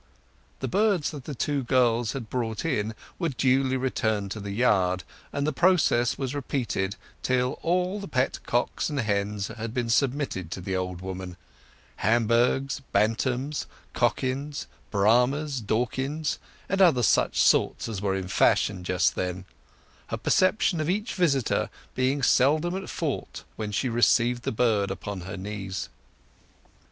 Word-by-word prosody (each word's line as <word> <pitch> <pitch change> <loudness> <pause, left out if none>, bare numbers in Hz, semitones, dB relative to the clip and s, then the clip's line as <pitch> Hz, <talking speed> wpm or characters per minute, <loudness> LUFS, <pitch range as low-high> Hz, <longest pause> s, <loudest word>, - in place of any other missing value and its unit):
The 130 - -1
birds 200 - +2
that 145 -5 -8
the 145 - -5
two 140 +2 -1
girls 120 -2 +2
had 130 -5 -5
brought 115 +2 -3
in 110 -8 -1 0.2
were 170 -3 0
duly 130 0 +2
returned 110 -6 -1
to 110 - -4
the 100 0 -6
yard, 95 -4 +2 0.3
and 140 - -1
the 155 - 0
process 155 -8 +3
was 135 -1 -3
repeated 125 -8 -2 0.3
till 125 0 0
all 180 +4 0
the 200 - -6
pet 130 -3 0
cocks 120 +6 0
and 145 -2 -2
hens 105 -2 -1
had 115 0 -6
been 120 -2 0
submitted 130 - 0
to 95 - -5
the 95 +1 -3
old 90 -1 -3
woman—Hamburghs, 115 +7 -1
Bantams, 125 +6 0 0.3
Cochins, 140 +3 -1 0.2
Brahmas, 125 +7 +2
Dorkings, 130 +8 -1 0.3
and 195 - -1
such - - +7
other 125 -7 +2
sorts - - +3
as 105 -4 -4
were 100 -2 0
in 95 -1 -3
fashion 95 +1 +2
just 90 0 +2
then—her 90 0 -7
perception 185 -3 +2
of 155 - -1
each 210 +5 -1
visitor 140 - +1 0.2
being 135 +2 0
seldom 155 +9 +3
at 190 0 -5
fault - - -3 0.2
as 105 -1 -3
she 130 - 0
received 120 0 +3
the - - 0
bird 110 -4 +2
upon 95 0 -5
her 95 +3 -6
knees. 95 -1 -5
125 Hz, 145 wpm, -26 LUFS, 105-140 Hz, 0.3 s, such